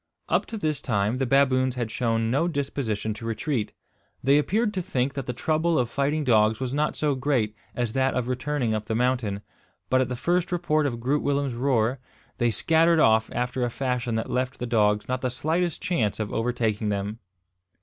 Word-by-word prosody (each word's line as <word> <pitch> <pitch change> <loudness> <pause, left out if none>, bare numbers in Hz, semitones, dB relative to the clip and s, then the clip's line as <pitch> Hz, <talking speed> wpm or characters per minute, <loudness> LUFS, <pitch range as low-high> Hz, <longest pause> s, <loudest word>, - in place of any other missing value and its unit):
Up - - +1
to 225 - -5
this 155 -7 -1
time 105 0 0
the 135 - 0
baboons 130 -1 +3
had 120 -3 -3
shown 115 -1 0
no 145 +7 +2
disposition 130 -9 -2
to 110 - -10
retreat. 115 +1 -2 0.5
They 140 +3 +5
appeared 210 +8 0
to 185 - -1
think 135 -7 -1
that 135 -3 -5
the - - 0
trouble 155 +6 0
of 120 -2 0
fighting 145 +2 0
dogs 110 -4 +3
was 130 -1 -3
not 150 +1 0
so 150 -2 +1
great 130 -5 0 0.2
as 120 -3 -1
that 135 0 +1
of 125 -2 -1
returning 125 -1 -1
up 110 -1 -2
the 110 - -2
mountain; 120 -5 0 0.5
but 130 0 +4
at 130 - -1
the 125 - -2
first 175 +8 0
report 155 -4 +1
of 120 -4 -4
Groot 135 +5 0
Willem's 140 -2 0
roer, 125 0 +1 0.4
they 120 - +3
scattered 165 +7 +3
off 110 -4 +4
after 125 +1 -1
a 120 - +1
fashion 125 -2 -2
that 110 - -2
left 130 +1 -1
the 125 - -4
dogs 105 -3 +2
not 130 0 -2
the 130 - 0
slightest 160 +6 -1
chance 110 - 0
of 105 -1 -3
overtaking 115 -2 0
them. 100 +2 -3
125 Hz, 200 wpm, -25 LUFS, 115-145 Hz, 0.5 s, They